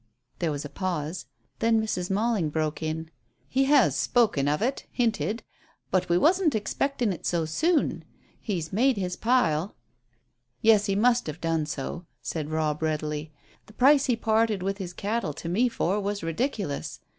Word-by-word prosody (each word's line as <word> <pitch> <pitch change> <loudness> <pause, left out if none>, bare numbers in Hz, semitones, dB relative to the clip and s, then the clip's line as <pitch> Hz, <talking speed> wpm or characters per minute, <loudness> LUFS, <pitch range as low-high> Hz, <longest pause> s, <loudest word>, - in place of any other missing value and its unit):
There 170 - 0
was 145 0 -4
a - - -6
pause. 175 -2 -3 0.3
Then 225 0 +3
Mrs. 185 -5 -2
Malling 205 -4 +1
broke 155 0 -2
it 160 0 -3 0.4
"He 270 +1 +2
has 280 -1 +4
spoken 210 - +2
of 150 +1 +1
it 255 +5 -2
hinted. 230 -2 0 0.5
But 185 -1 +1
we 170 - +4
wasn't 335 - +3
expectin' 235 +1 0
it - - -10
so 170 -2 +1
soon. 310 - +1 0.4
He's 175 -7 -3
made 250 +3 +3
his 180 -2 -2
pile." 200 -8 +1 0.8
"Yes, 215 -2 +4
he 195 - +1
must 240 +2 +3
have 155 +2 -5
done 165 -2 0
so," 155 +4 -5
said 155 -3 -4
Robb 155 -1 -1
readily. 155 -1 -2 0.4
"The 215 - -15
price 275 +4 +5
he 245 - +3
parted 220 -3 +1
with 195 +1 -2
his 180 -3 -5
cattle 205 -3 -2
to 165 - -7
me 225 +9 +2
for 205 -3 0
was 205 -1 -3
ridiculous. 170 - -2
195 Hz, 165 wpm, -27 LUFS, 160-230 Hz, 0.8 s, price